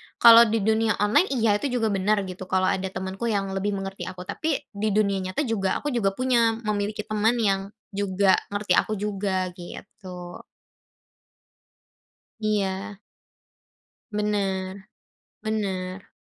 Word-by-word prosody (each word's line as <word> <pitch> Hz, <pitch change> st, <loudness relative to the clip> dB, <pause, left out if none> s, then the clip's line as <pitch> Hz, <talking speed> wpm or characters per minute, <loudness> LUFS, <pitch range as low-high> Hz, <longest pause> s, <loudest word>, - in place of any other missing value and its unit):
kalau 235 Hz, 0 st, +9 dB
di 220 Hz, -1 st, 0 dB
dunia 220 Hz, 0 st, +2 dB
online 220 Hz, -, +4 dB
iya, 215 Hz, -3 st, +2 dB
itu 285 Hz, -, -1 dB
juga 225 Hz, -3 st, +1 dB
benar 200 Hz, +1 st, +1 dB
gitu, 185 Hz, 0 st, -7 dB
kalau 185 Hz, 0 st, +2 dB
ada 190 Hz, 0 st, -1 dB
temenku 190 Hz, +4 st, -4 dB
yang 200 Hz, -3 st, -1 dB
lebih 200 Hz, +1 st, -1 dB
mengerti 195 Hz, 0 st, -5 dB
aku, 185 Hz, -1 st, -7 dB
tapi 290 Hz, -, -2 dB
di 210 Hz, 0 st, -1 dB
dunia 200 Hz, -2 st, +2 dB
nyata 185 Hz, +10 st, -2 dB
juga 200 Hz, -6 st, 0 dB
aku 295 Hz, -, -1 dB
juga 195 Hz, -6 st, 0 dB
punya, 235 Hz, -3 st, +2 dB
memiliki 210 Hz, 0 st, -2 dB
teman 215 Hz, +3 st, +1 dB
yang 195 Hz, -4 st, +1 dB, 0.2 s
juga 195 Hz, -1 st, +2 dB
ngerti 205 Hz, 0 st, -4 dB
aku 215 Hz, -, -1 dB
juga, 195 Hz, -2 st, -2 dB
gitu. 180 Hz, -1 st, -9 dB, 2.0 s
Iya. 205 Hz, -1 st, -1 dB, 1.1 s
Bener. 195 Hz, -2 st, -2 dB, 0.5 s
Bener. 195 Hz, -4 st, -3 dB
200 Hz, 130 wpm, -25 LUFS, 190-215 Hz, 2.0 s, kalau